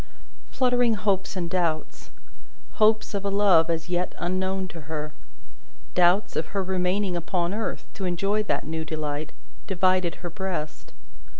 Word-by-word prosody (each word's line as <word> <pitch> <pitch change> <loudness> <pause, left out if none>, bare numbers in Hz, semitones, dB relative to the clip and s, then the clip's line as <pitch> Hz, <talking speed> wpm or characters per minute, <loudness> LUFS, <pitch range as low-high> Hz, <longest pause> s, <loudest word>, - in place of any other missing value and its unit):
Fluttering 245 -3 +2
hopes 200 -1 0
and 175 -2 -1
doubts 170 -3 -1 0.7
hopes, 215 0 +4
of 200 -1 -2
a 200 - 0
love 195 -5 +5
as 165 0 -1
yet 180 0 -1
unknown 185 +1 -1
to 165 - -9
her: 150 -1 -4 0.8
doubts, 180 +3 +3
of 155 - -1
her 195 -1 -2
remaining 185 +1 0
upon 175 +1 -1
earth, 220 +1 -3
to 195 - -4
enjoy 195 +4 +1
that 210 - -1
new 160 +1 -3
delight 155 -1 -3 0.4
divided 185 -2 +2
her 175 -1 -7
breast. 180 -5 -4
185 Hz, 140 wpm, -26 LUFS, 170-200 Hz, 0.8 s, love